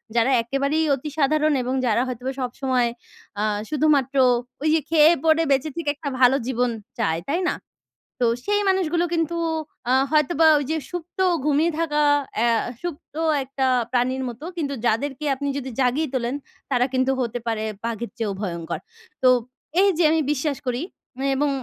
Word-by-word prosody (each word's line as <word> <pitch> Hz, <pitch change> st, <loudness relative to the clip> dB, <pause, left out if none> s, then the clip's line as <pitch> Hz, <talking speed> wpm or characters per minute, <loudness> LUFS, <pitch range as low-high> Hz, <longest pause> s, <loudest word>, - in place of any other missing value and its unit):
যারা 235 Hz, +3 st, +3 dB
একেবারেই 275 Hz, +6 st, 0 dB
অতি 275 Hz, +3 st, -6 dB
সাধারণ 305 Hz, +1 st, +3 dB
এবং 250 Hz, +1 st, -2 dB
যারা 235 Hz, 0 st, +2 dB
হয়তোবা 255 Hz, +1 st, -4 dB
সবসময় 250 Hz, -1 st, 0 dB, 0.5 s
আ -, -, +1 dB, 0.3 s
শুধুমাত্র 290 Hz, -3 st, +2 dB, 0.5 s
ঐ -, -, -5 dB
যে 320 Hz, -, +4 dB
খেয়ে, 315 Hz, 0 st, +6 dB
পড়ে 320 Hz, +1 st, +4 dB
বেঁচে 275 Hz, +3 st, +2 dB
থেকে 335 Hz, -3 st, -2 dB
একটা 290 Hz, 0 st, -5 dB
ভালো 255 Hz, +1 st, +6 dB
জীবন 250 Hz, -1 st, +1 dB, 0.3 s
চায়। 160 Hz, 0 st, +1 dB
তাই 320 Hz, +5 st, 0 dB
না? -, -, -1 dB, 0.6 s
তো 245 Hz, -, +3 dB, 0.2 s
সেই 415 Hz, 0 st, +2 dB
মানুষগুলো 350 Hz, -3 st, +1 dB
কিন্তু 335 Hz, 0 st, 0 dB, 0.5 s
আ -, -, +5 dB, 0.2 s
হয়তোবা 310 Hz, +1 st, +3 dB
ঐ -, -, +1 dB
যে 320 Hz, -, +1 dB
সুপ্ত, 355 Hz, +2 st, -7 dB, 0.3 s
ঘুমিয়ে 305 Hz, +3 st, +3 dB
থাকা 300 Hz, -2 st, +1 dB, 0.4 s
অ্যা 235 Hz, +1 st, +3 dB, 0.3 s
সুপ্ত 340 Hz, -4 st, -7 dB, 0.3 s
একটা 265 Hz, 0 st, -1 dB, 0.2 s
প্রাণীর 255 Hz, +1 st, 0 dB
মতো। 240 Hz, +6 st, -9 dB
কিন্তু 285 Hz, -4 st, -2 dB
যাদেরকে 270 Hz, +6 st, 0 dB
আপনি 285 Hz, +2 st, -4 dB
যদি 265 Hz, -1 st, -4 dB
জাগিয়ে 265 Hz, +5 st, +1 dB
তোলেন, 250 Hz, 0 st, -1 dB, 0.4 s
তারা 250 Hz, -1 st, +3 dB
কিন্তু 260 Hz, +1 st, +2 dB
হতে 245 Hz, 0 st, -2 dB
পারে 225 Hz, -1 st, -1 dB, 0.2 s
বাঘের 230 Hz, 0 st, -3 dB
চেয়েও 220 Hz, -4 st, -1 dB
ভয়ংকর। 170 Hz, -4 st, -4 dB, 0.4 s
তো 255 Hz, -, +7 dB, 0.5 s
এই 400 Hz, -, +5 dB
যে 350 Hz, -, +3 dB
আমি 320 Hz, 0 st, +2 dB
বিশ্বাস 290 Hz, 0 st, -1 dB
করি 250 Hz, +4 st, -2 dB, 0.5 s
এবং 290 Hz, +2 st, +1 dB
275 Hz, 160 wpm, -23 LUFS, 245-310 Hz, 0.6 s, তো